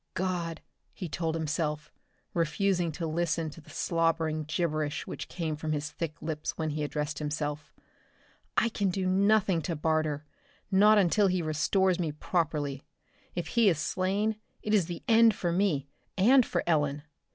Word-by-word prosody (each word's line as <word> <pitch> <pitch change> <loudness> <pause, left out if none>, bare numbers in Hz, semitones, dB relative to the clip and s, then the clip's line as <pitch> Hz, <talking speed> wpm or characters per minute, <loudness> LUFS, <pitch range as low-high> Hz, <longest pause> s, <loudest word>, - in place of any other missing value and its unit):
"God," 175 -3 -2 0.3
he 180 - -5
told 165 0 -2
himself, 155 -1 -2 0.4
refusing 175 +1 +1
to 165 - -4
listen 165 0 -1
to 165 - -12
the - - -19
slobbering 165 -2 0
gibberish 155 -2 -1
which - - -6
came 160 -3 -3
from 155 +1 -3
his 150 0 -3
thick 160 0 -5
lips 155 -1 -3
when 160 -1 -1
he 150 0 -2
addressed 150 -1 -3
himself, 150 0 -3 0.9
"I 235 - +4
can 200 -3 0
do 185 +1 -1
nothing 195 -1 +3
to 170 +1 -3
Barter 155 -1 0 0.5
not 210 +3 +6
until 200 +1 +4
he 180 -2 0
restores 175 +4 +2
me 165 -4 0
properly. 150 -4 -1 0.5
If 175 - -3
he 230 -4 +4
is 165 - +1
slain, 195 +7 0 0.3
it 215 - -1
is 195 -6 +3
the 175 -1 -6
end 225 -1 +6
for 175 - -1
me, 170 -7 +1 0.3
and 250 +7 +6
for - - -1
Ellen! 150 -3 +1
165 Hz, 160 wpm, -29 LUFS, 150-185 Hz, 0.9 s, not